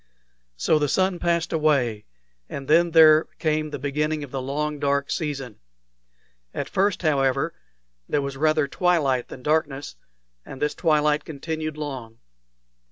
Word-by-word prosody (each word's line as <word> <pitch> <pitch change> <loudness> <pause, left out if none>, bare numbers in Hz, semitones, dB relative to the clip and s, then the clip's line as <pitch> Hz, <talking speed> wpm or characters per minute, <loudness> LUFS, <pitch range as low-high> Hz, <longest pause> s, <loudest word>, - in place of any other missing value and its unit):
So 155 - +2
the 145 -1 0
sun 185 +1 +1
passed 170 0 0
away, 135 -9 +1 0.4
and 135 -1 -6
then 170 +3 +4
there 160 -1 +7
came 155 -1 0
the 145 - -5
beginning 150 +2 -2
of 140 - -9
the 135 - -3
long 150 +3 -3
dark 140 0 0
season. 135 - -4 1.0
At - - -3
first, 195 0 0
however, 135 0 +1 0.6
there 145 - +1
was 140 0 -4
rather 155 +1 +2
twilight 140 -7 +1
than 125 - -11
darkness, 150 - -1 0.5
and 135 - -10
this 150 0 0
twilight 150 -2 +2
continued 155 +1 -5
long. 130 -7 -6
150 Hz, 140 wpm, -24 LUFS, 140-155 Hz, 1.0 s, there